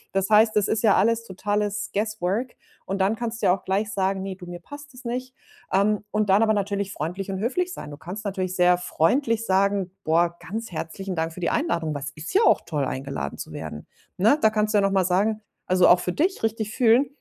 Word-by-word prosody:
Das 195 Hz, 0 st, +1 dB
heißt, 215 Hz, +1 st, +5 dB
es 210 Hz, -, +3 dB
ist 220 Hz, 0 st, 0 dB
ja 210 Hz, -3 st, +5 dB
alles 230 Hz, +4 st, +2 dB
totales 205 Hz, 0 st, -2 dB
guesswork 215 Hz, +3 st, -1 dB, 0.3 s
und 195 Hz, +1 st, -3 dB
dann 195 Hz, +3 st, +2 dB
kannst 230 Hz, 0 st, -4 dB
du -, -, +3 dB
ja 180 Hz, -, +5 dB
auch -, -, -21 dB
gleich 205 Hz, +3 st, 0 dB
sagen: 195 Hz, -1 st, 0 dB
„Ne 190 Hz, 0 st, -5 dB
du, 180 Hz, -1 st, -11 dB
mir 175 Hz, 0 st, -8 dB
passt 285 Hz, -, -11 dB
es 250 Hz, +1 st, -14 dB
nicht.“ 255 Hz, +2 st, -4 dB, 0.4 s
Ähm, 205 Hz, +2 st, +2 dB
und 210 Hz, -1 st, 0 dB
dann 200 Hz, +4 st, +5 dB
aber 220 Hz, -1 st, +3 dB
natürlich 200 Hz, -1 st, -2 dB
freundlich 180 Hz, +6 st, -4 dB
und 190 Hz, -, -3 dB
höflich 360 Hz, -, -1 dB
sein. 150 Hz, -, -8 dB
Du 145 Hz, -, -9 dB
kannst 185 Hz, +7 st, -7 dB
natürlich 185 Hz, -3 st, -3 dB
sehr 180 Hz, 0 st, +4 dB
freundlich 225 Hz, -, +1 dB
sagen: 195 Hz, 0 st, +2 dB
„Boah, 170 Hz, +2 st, +2 dB
ganz 225 Hz, +3 st, -6 dB
herzlichen 180 Hz, +3 st, -5 dB
Dank 165 Hz, 0 st, -2 dB
für 180 Hz, -, -10 dB
die 175 Hz, -, 0 dB
Einladung“, 160 Hz, -3 st, -1 dB
weil 140 Hz, -, -4 dB
es 145 Hz, -, -5 dB
ist 155 Hz, +1 st, -8 dB
ja 420 Hz, -, +5 dB
auch -, -, +5 dB
toll, 150 Hz, -4 st, -2 dB
eingeladen 130 Hz, -, -4 dB
zu -, -, -7 dB
werden, 75 Hz, -, -7 dB, 0.3 s
ne? 220 Hz, +10 st, +4 dB
Da 220 Hz, -, +4 dB
kannst 215 Hz, 0 st, 0 dB
du -, -, +6 dB
ja -, -, +4 dB
noch 195 Hz, -, +2 dB
mal 190 Hz, -2 st, +2 dB
sagen 205 Hz, +4 st, +1 dB, 0.2 s
also, 185 Hz, 0 st, +4 dB
auch 175 Hz, -, +6 dB
für 180 Hz, -, -2 dB
dich 355 Hz, -, 0 dB
richtig 220 Hz, -1 st, -2 dB
fühlen: 250 Hz, +2 st, +4 dB
200 Hz, 235 wpm, -24 LUFS, 180-220 Hz, 0.4 s, du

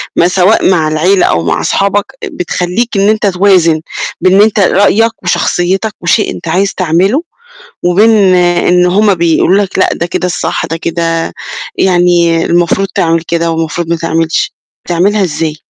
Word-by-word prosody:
ما 170 Hz, -, +3 dB
سواء 185 Hz, +3 st, +2 dB
مع 165 Hz, -4 st, +1 dB
العيلة 175 Hz, +5 st, +1 dB
أو 85 Hz, -1 st, 0 dB
مع 85 Hz, -, -1 dB
صحابك 200 Hz, +1 st, 0 dB, 0.2 s
بتخلّيك 180 Hz, +6 st, -3 dB
إن 200 Hz, +1 st, +2 dB
أنت 215 Hz, -1 st, 0 dB
توازن 180 Hz, -4 st, +2 dB, 0.4 s
بين 185 Hz, +1 st, +3 dB
إن 200 Hz, -, +5 dB
أنت 215 Hz, 0 st, +2 dB
رأيك 205 Hz, +4 st, +1 dB
وشخصيتك، 185 Hz, +3 st, -1 dB
وشيء 190 Hz, +5 st, +1 dB
أنت -, -, -10 dB
عايز 190 Hz, +5 st, 0 dB
تعمله، 185 Hz, -, 0 dB, 0.6 s
وبين 195 Hz, +6 st, +3 dB, 0.2 s
إن 180 Hz, 0 st, +2 dB
هم 200 Hz, +3 st, +2 dB
بيقولوا 170 Hz, +3 st, +2 dB
لك 190 Hz, -, -6 dB
لأ، -, -, +3 dB
ده 170 Hz, -, -3 dB
كده 180 Hz, +1 st, -3 dB
الصح، 180 Hz, -, -3 dB
ده 165 Hz, -, -4 dB
كده 165 Hz, 0 st, -2 dB, 0.4 s
يعني 175 Hz, -2 st, +2 dB
المفروض 175 Hz, +3 st, 0 dB
تعمل 165 Hz, -1 st, 0 dB
كده، 170 Hz, 0 st, -2 dB
والمفروض 165 Hz, +1 st, -3 dB
ما 170 Hz, -, 0 dB
تعملش، 165 Hz, 0 st, -1 dB, 0.3 s
بتعملها 195 Hz, +4 st, +1 dB
إزاي؟ 155 Hz, -2 st, -3 dB
180 Hz, 155 wpm, -10 LUFS, 165-195 Hz, 0.6 s, إن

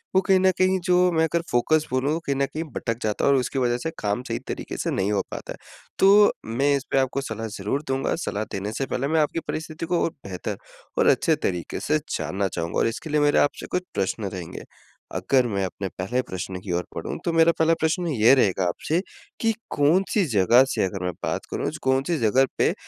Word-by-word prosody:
वो 190 Hz, -, +6 dB
कहीं 190 Hz, -1 st, +3 dB
न 190 Hz, 0 st, +4 dB
कहीं 185 Hz, 0 st, +3 dB
जो 180 Hz, 0 st, +4 dB
मैं 160 Hz, -1 st, +2 dB
अगर 165 Hz, +1 st, +1 dB
फ़ोकस 155 Hz, +6 st, +2 dB
बोलूँ 140 Hz, +5 st, +1 dB
कहीं 140 Hz, -, 0 dB
न 140 Hz, 0 st, +1 dB
कहीं 155 Hz, +4 st, -5 dB
भटक 115 Hz, 0 st, -2 dB
जाता 105 Hz, -1 st, 0 dB
है 140 Hz, -, +5 dB
और 135 Hz, -, +4 dB
उसकी 130 Hz, +1 st, -1 dB
वजह 120 Hz, -1 st, +1 dB
से 160 Hz, -, -2 dB
काम 105 Hz, +4 st, -1 dB
सही 115 Hz, +1 st, -2 dB
तरीके -, -, -5 dB
से -, -, -2 dB
नहीं 95 Hz, +2 st, 0 dB
हो 100 Hz, -, +2 dB
पाता -, -, -6 dB
है। -, -, -13 dB, 0.4 s
तो 205 Hz, +2 st, +7 dB
मैं 135 Hz, +6 st, +1 dB
इसपे 135 Hz, 0 st, -2 dB
आपको 135 Hz, +1 st, 0 dB
सलाह 115 Hz, -3 st, -5 dB
ज़रूर 120 Hz, +10 st, -2 dB
दूँगा। 135 Hz, 0 st, 0 dB
सलाह 105 Hz, +2 st, -2 dB
देने 100 Hz, +2 st, -3 dB
से 135 Hz, -, -1 dB
पहले 135 Hz, +2 st, -2 dB
मैं 160 Hz, +1 st, +2 dB
आपकी 150 Hz, +2 st, 0 dB
परिस्थिति 160 Hz, +1 st, -4 dB
को 175 Hz, 0 st, +1 dB
और -, -, +1 dB, 0.2 s
बेहतर 95 Hz, -2 st, -5 dB, 0.4 s
और -, -, +3 dB
अच्छे -, -, +4 dB
तरीके 90 Hz, -2 st, -4 dB
से 155 Hz, -, +1 dB, 0.2 s
जानना 100 Hz, +1 st, -1 dB
चाहूँगा। 85 Hz, -2 st, -3 dB
और -, -, +3 dB
इसके 115 Hz, +7 st, -5 dB
लिए 150 Hz, 0 st, +2 dB
मेरे 145 Hz, 0 st, +4 dB
आपसे 145 Hz, -, 0 dB
कुछ 180 Hz, 0 st, 0 dB
प्रश्न 100 Hz, +2 st, -1 dB
रहेंगे। 90 Hz, -3 st, -7 dB, 0.5 s
अगर 130 Hz, -2 st, +2 dB
मैं 100 Hz, -3 st, -1 dB
अपने 95 Hz, +1 st, -4 dB
पहले 120 Hz, +8 st, -1 dB
प्रश्न 95 Hz, 0 st, -5 dB
की 95 Hz, -, -6 dB
ओर 90 Hz, -, -2 dB
बढ़ूँ -, -, -4 dB
तो 170 Hz, -, +1 dB
मेरा 165 Hz, 0 st, +5 dB
पहला 165 Hz, +1 st, +4 dB
प्रश्न 170 Hz, +2 st, 0 dB
ये 125 Hz, -3 st, +5 dB
रहेगा 95 Hz, -6 st, +2 dB
आपसे 155 Hz, -, -1 dB, 0.4 s
की 225 Hz, -1 st, +2 dB, 0.2 s
कौन-सी 180 Hz, +6 st, +3 dB
जगह 115 Hz, +6 st, +6 dB
से -, -, +1 dB
अगर 95 Hz, -1 st, -4 dB
मैं 90 Hz, -, 0 dB
बात -, -, -2 dB
करूँ -, -, -2 dB
कौन-सी 135 Hz, +5 st, +1 dB
जगह 130 Hz, +5 st, +4 dB
पे -, -, +3 dB
135 Hz, 220 wpm, -24 LUFS, 105-160 Hz, 0.5 s, तो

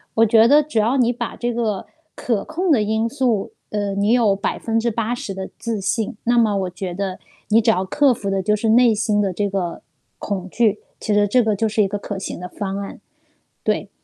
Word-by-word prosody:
我 225 Hz, 0 st, +5 dB
觉 225 Hz, +1 st, +5 dB
得 295 Hz, +3 st, +6 dB
只 285 Hz, -7 st, -1 dB
要 235 Hz, +6 st, +2 dB
你 245 Hz, -1 st, +3 dB
把 235 Hz, -1 st, -5 dB
这 240 Hz, 0 st, -2 dB
个 220 Hz, -5 st, -2 dB, 0.3 s
可 225 Hz, -5 st, -1 dB
控 355 Hz, +1 st, -1 dB
的 235 Hz, -7 st, +4 dB
因 220 Hz, +2 st, 0 dB
素 240 Hz, -6 st, 0 dB, 0.2 s
呃， 205 Hz, -1 st, -2 dB
你 200 Hz, +3 st, +1 dB
有 220 Hz, -5 st, +3 dB
80% 225 Hz, 0 st, -2 dB
的 190 Hz, 0 st, -5 dB
自 225 Hz, -3 st, -3 dB
信， 210 Hz, +2 st, -1 dB
那 240 Hz, 0 st, +3 dB
么 215 Hz, -3 st, +2 dB
我 185 Hz, -2 st, -1 dB
觉 185 Hz, 0 st, -5 dB
得， 195 Hz, -1 st, -3 dB, 0.3 s
你 225 Hz, +2 st, +5 dB
只 225 Hz, -, +2 dB
要 190 Hz, -3 st, +2 dB
克 280 Hz, +7 st, +3 dB
服 200 Hz, -4 st, -2 dB
的 195 Hz, 0 st, 0 dB
就 210 Hz, +2 st, +2 dB
是 220 Hz, +1 st, -1 dB
内 235 Hz, -1 st, +5 dB
心 210 Hz, -1 st, +1 dB
的 195 Hz, -2 st, 0 dB
这 205 Hz, +2 st, -1 dB
个 185 Hz, -3 st, -3 dB, 0.4 s
恐 190 Hz, -2 st, -4 dB
惧， 215 Hz, -1 st, +1 dB, 0.2 s
其 210 Hz, -, -1 dB
实 205 Hz, 0 st, +3 dB
这 245 Hz, +3 st, +3 dB
个 215 Hz, -1 st, +1 dB
就 220 Hz, +3 st, 0 dB
是 215 Hz, 0 st, +2 dB
一 195 Hz, -, +1 dB
个 205 Hz, +1 st, -3 dB
可 200 Hz, 0 st, -5 dB
行 190 Hz, -, -5 dB
的 180 Hz, -, -6 dB
方 195 Hz, +1 st, -4 dB
案。 200 Hz, 0 st, -7 dB, 0.7 s
对。 -, -, -1 dB
215 Hz, 230 characters per minute, -21 LUFS, 200-235 Hz, 0.7 s, 得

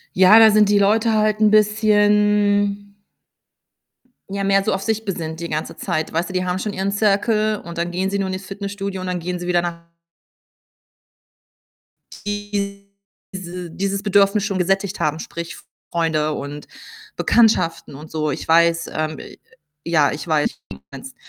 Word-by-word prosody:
Ja, 190 Hz, +4 st, +7 dB
da 225 Hz, -1 st, +8 dB
sind 210 Hz, -1 st, +4 dB
die 205 Hz, 0 st, +4 dB
Leute 220 Hz, +3 st, +2 dB
halt 215 Hz, 0 st, +1 dB
'n 215 Hz, -1 st, +5 dB
bisschen 205 Hz, -1 st, +2 dB, 1.4 s
ja, 200 Hz, 0 st, -3 dB
mehr 195 Hz, 0 st, +3 dB
so 215 Hz, -, 0 dB
auf 195 Hz, 0 st, -2 dB
sich 220 Hz, +2 st, -2 dB
besinnt 160 Hz, -5 st, -5 dB
die 170 Hz, -, -4 dB
ganze 155 Hz, 0 st, -4 dB
Zeit. 155 Hz, -, -3 dB
Weißt 170 Hz, +3 st, -1 dB
du, -, -, -8 dB
die 185 Hz, 0 st, -1 dB
haben 180 Hz, 0 st, -2 dB
schon 210 Hz, +2 st, -3 dB
ihren 195 Hz, 0 st, -2 dB
Circle 215 Hz, +1 st, +1 dB
und 170 Hz, 0 st, -9 dB
dann 170 Hz, +1 st, -2 dB
gehen 185 Hz, +2 st, -1 dB
sie 200 Hz, -, -1 dB
nur 195 Hz, -1 st, -1 dB
in 185 Hz, -, -3 dB
ihr 185 Hz, -, -5 dB
Fitnessstudio 200 Hz, 0 st, -6 dB
und 185 Hz, -, -5 dB
dann 180 Hz, -1 st, -2 dB
gehen 180 Hz, +1 st, -4 dB
sie 175 Hz, -, -6 dB
wieder 175 Hz, -1 st, +2 dB
nach 170 Hz, -1 st, -5 dB, 2.4 s
diese 200 Hz, -1 st, -4 dB, 0.8 s
dieses 195 Hz, +2 st, -2 dB
Bedürfnis 200 Hz, 0 st, +3 dB
schon 200 Hz, -3 st, -2 dB
gesättigt 195 Hz, +2 st, -1 dB
haben, 155 Hz, +1 st, 0 dB
sprich 170 Hz, +1 st, -7 dB, 0.4 s
Freunde 160 Hz, -2 st, 0 dB
und 145 Hz, 0 st, -6 dB, 0.5 s
Bekanntschaften 220 Hz, -11 st, +2 dB
und 150 Hz, +3 st, -11 dB
so. 155 Hz, -1 st, -1 dB
Ich -, -, -5 dB
weiß, 170 Hz, +1 st, +3 dB
ähm 155 Hz, 0 st, -3 dB, 0.7 s
ja, 155 Hz, -4 st, +2 dB
ich 150 Hz, +2 st, -7 dB
weiß, 155 Hz, -2 st, +2 dB
was -, -, -20 dB, 0.2 s
du -, -, -37 dB
meinst. -, -, -10 dB
195 Hz, 165 wpm, -20 LUFS, 170-205 Hz, 2.4 s, da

